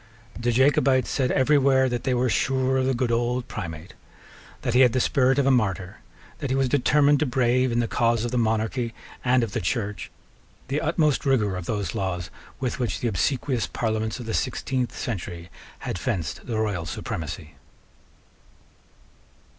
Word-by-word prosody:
The 120 +1 -1
Jacobites 130 +1 +3
said 130 -3 +1
every 140 +2 +4
where 130 -1 +4
that 120 -2 -3
they 130 - +2
were 125 +1 +2
sure 130 +3 +1
of 130 0 +1
the 135 - +1
good 120 0 0
old 120 +1 0
Primate; 80 0 -7 0.7
that 120 -3 0
he 125 - +4
had 125 -3 +6
the 130 - +2
spirit 130 +1 +3
of 140 - +3
a 135 - +4
martyr; 95 -7 0 0.4
that 140 - -3
he 130 - +1
was 135 -1 +2
determined 145 +2 +3
to 155 - +1
brave, 125 0 +2
in 120 +1 +2
the 115 - -1
cause 115 -1 +1
of 120 - -3
the 125 - 0
Monarchy 115 +1 0 0.3
and 125 -1 +3
of 110 - -3
the - - -2
Church, 105 +2 -2 0.6
the 140 +2 0
utmost 155 -2 +1
rigour 110 -8 +2
of 90 -2 -6
those 105 -3 -2
laws 90 -3 -3 0.3
with 130 -1 -2
which 115 -7 -1
the 120 - 0
obsequious 120 +2 0
parliaments 110 +5 -2
of 120 - -7
the 110 - -3
sixteenth 130 -2 -2
century 90 -6 -5 0.3
had 90 - -3
fenced 90 - -3
the 115 -3 -2
Royal 100 -6 -1
Supremacy. 80 0 -5
120 Hz, 180 wpm, -25 LUFS, 110-130 Hz, 0.7 s, had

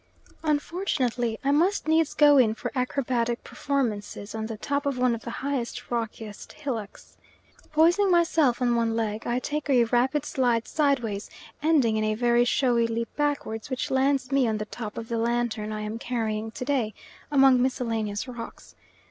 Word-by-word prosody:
Unfortunately, 290 - -1
I 275 - +2
must 335 +4 +2
needs 320 -1 +2
go 290 -2 +6
in 220 -3 +4
for - - -5
acrobatic 250 -2 -1
performances 225 -7 -3
on 220 0 -3
the 220 -1 -6
top 280 +6 -2
of 275 -2 -1
one 250 -1 +2
of 230 - -4
the - - -7 0.2
highest, 265 -5 -3
rockiest 225 -3 -5
hillocks. 230 -8 -6 0.5
Poising 345 +6 +4
myself 320 -8 +3
on 240 -1 +2
one 230 -1 +1
leg 220 -1 -2
I 240 - 0
take 295 +3 -3
a 250 -3 +5
rapid 260 +5 +1
slide 240 -5 +1
sideways, 245 -9 0 0.3
ending 285 -8 +3
in 215 - 0
a 215 0 0
very 240 +1 +3
showy 240 -2 +2
leap 230 0 -4
backwards 285 -7 -2
which 260 -1 -3
lands 265 0 +1
me 275 -3 +3
on 220 -1 0
the 215 - -3
top 215 -1 -7
of 230 - -5
the 230 0 -2
lantern 230 -2 -1
I 215 0 -4
am 215 +2 -4
carrying 225 -3 -2
to 250 - -6
day, 245 -7 0 0.4
among 270 -3 +5
miscellaneous 225 -4 -1
rocks. 235 -2 -9
245 Hz, 170 wpm, -26 LUFS, 225-280 Hz, 0.5 s, go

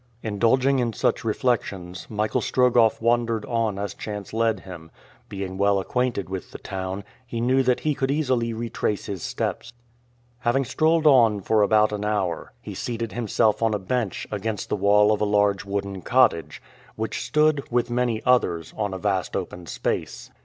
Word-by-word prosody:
Indulging 125 +6 +2
in 120 -2 0
such 120 - 0
reflections, 100 -6 -2
Michael 105 0 -1
Strogoff 120 -3 +3
wandered 115 -1 +1
on 115 -4 -1
as 100 0 -3
chance 105 -2 -7
led 115 -1 +1
him; 85 -4 -10 0.4
being 95 -1 -5
well 100 0 +3
acquainted 120 -1 -1
with 95 -1 -6
the - - -9
town, 95 +1 -5 0.2
he 120 -2 -5
knew 130 +3 +3
that 125 -1 +1
he 155 - +1
could 135 -1 -1
easily 130 -5 +1
retrace 115 -2 -2
his 95 -4 -5
steps. 115 - -3 0.7
Having 130 +3 +1
strolled 160 +4 +2
on 120 -8 +5
for 110 +3 +2
about 105 +1 +4
an 105 0 -3
hour, 100 -6 -1
he - - -7
seated 115 -2 -4
himself 110 -2 +1
on 110 -2 +2
a - - +1
bench 105 +2 -2
against 105 0 -3
the - - +1
wall 105 +1 +4
of 105 - 0
a - - +3
large 105 -1 +2
wooden 100 -1 -3
cottage, 125 -10 +2 0.3
which 110 0 -3
stood, 150 -1 +2
with 120 0 +1
many 120 -2 0
others, 90 -11 +2
on 105 -3 -2
a - - -3
vast 95 -2 -1
open 85 -1 -5
space. - - -3
110 Hz, 170 wpm, -24 LUFS, 100-120 Hz, 0.7 s, on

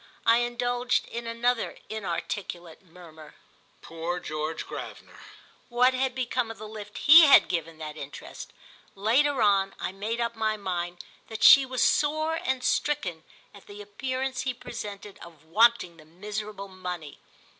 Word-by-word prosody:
I 230 0 +5
indulged 245 +1 0
in 235 0 -6
another 235 +1 -1
inarticulate 175 -4 -5
murmur—"Poor 165 0 -9
George 155 0 -4
Gravener!" - - -9 0.5
What 250 +1 +3
had 260 0 -1
become 250 -2 -1
of 225 - -8
the 215 - -9
lift 210 -1 -9
he 315 +2 +8
had 280 - +7
given 165 -2 -3
that 155 -1 -7
interest? 145 -2 -9 0.4
Later 245 +6 +2
on 195 -2 +2
I - - -3
made 210 +5 -4
up 235 0 -2
my 220 -1 -1
mind 175 -3 -4 0.2
that 220 -1 -6
she 275 -2 +9
was 255 -1 0
sore 310 +2 +1
and 260 -1 -1
stricken 250 - -1 0.3
at 200 - -16
the 205 0 -11
appearance 255 +5 -4
he 260 -1 -3
presented 205 -4 -8
of 160 -3 -14
wanting 210 -1 +3
the 155 - -16
miserable 205 +4 -7
money. 180 -5 -7
210 Hz, 145 wpm, -27 LUFS, 175-245 Hz, 0.5 s, she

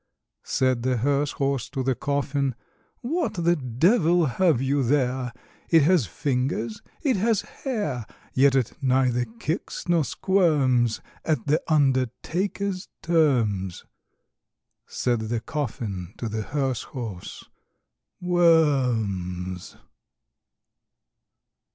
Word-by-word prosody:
Said 130 -2 +1
the 125 0 +1
hearse 140 +4 +1
horse 140 -4 -1
to 135 -2 -3
the 130 +1 +2
coffin, 140 0 -1 0.5
"What 325 +8 -1
the 170 -1 +2
devil 165 - +3
have 155 0 +2
you 135 +2 +1
there? 130 -1 +1 0.4
It 165 -3 +6
has 160 - +3
fingers, 125 - -2 0.2
it 265 -8 +2
has 220 +1 +2
hair; 180 - -4 0.3
Yet 135 +1 +4
it 130 -4 +1
neither 130 -2 +2
kicks 125 - -5
nor 170 -2 +3
squirms 140 - +2 0.2
At 155 -2 0
the 150 +2 +2
undertaker's 165 - 0 0.2
terms." 120 - +1 1.0
Said 120 -2 0
the 115 0 0
coffin 110 - -4
to 120 - -4
the 110 0 -3
hearse 135 +1 -1
horse, 115 - -7 0.7
"Worms!" 120 - +1
135 Hz, 100 wpm, -25 LUFS, 120-160 Hz, 1.0 s, It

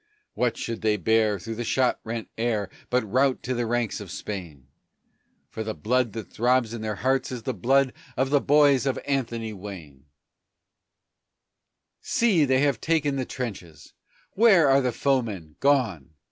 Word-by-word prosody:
What 120 -2 0
should 115 -1 -4
they 110 -1 +2
bear 110 +2 +2
through 115 +5 -6
the 120 +2 -4
shot 125 +2 +1
rent 115 0 -5
air 110 -4 -1 0.2
but 125 -1 +2
rout 130 +5 +1
to 130 - -2
the 120 -1 -1
ranks 120 -2 -1
of 100 -3 -9
Spain, 85 -8 -7 0.8
For 110 - -6
the 110 0 -4
blood 120 0 0
that 110 -3 -7
throbs 120 -1 +2
in 115 - -5
their 110 -1 -3
hearts 130 +6 0
is 125 -3 -6
the 130 - -2
blood 130 +6 +2 0.2
of 135 +1 0
the 145 -1 +4
boys 145 -2 +4
of 135 - 0
Anthony 115 -5 -2
Wayne! 90 -9 -10 2.0
See, 200 -10 +2
they 130 -1 +2
have 140 -3 +1
taken 155 -4 +1
the 130 -2 -2
trenches! 100 -12 -7 0.4
Where 195 -8 +5
are 135 +1 +5
the 125 -1 0
foemen? 110 - -1
Gone! 110 - +1
120 Hz, 160 wpm, -25 LUFS, 105-135 Hz, 2.0 s, Where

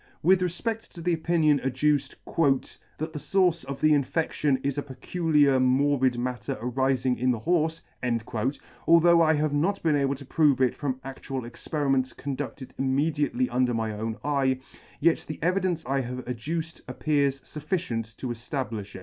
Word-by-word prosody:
With 185 +3 +5
refped 220 +6 -2
to 170 - -9
the 175 +1 +1
opinion 160 -3 +2
adduced 135 +2 0
" - - -43 0.7
that 155 +1 -4
the 150 - -4
fource 175 +2 +2
of 135 +1 -6
the 155 - +5
infedion 145 -1 +1
is 140 0 0
a - - -1
peculiar 145 0 +2
morbid 130 0 +3
matter 125 +2 -3
arifing 125 +1 0
in 130 +1 +2
the 120 -3 0
horfe," 165 +1 +1 1.1
although 170 0 +6
I 160 -1 +4
have 150 0 0
not 180 +8 0
been 160 -3 +3
able 140 -1 +1
to 140 +1 -11
prove 145 -2 +3
it 130 -2 +2
from 140 -3 -2
adual 135 -1 -5
experiments 135 +2 -1
conduded 140 -1 -6
immediately 150 - +1
under 125 - +1
my 110 -1 -1
own 110 +1 -4
eye, 135 -3 +1 0.4
yet 165 +2 +3
the 155 - -5
evidence 180 -2 0
I 135 +1 0
have 125 0 -6
adduced 160 +7 -4
appears 140 +1 0
fufficient 145 - -4
to 130 - -5
eflablifh 115 -4 -4
it. - - -6
140 Hz, 160 wpm, -27 LUFS, 130-160 Hz, 1.1 s, although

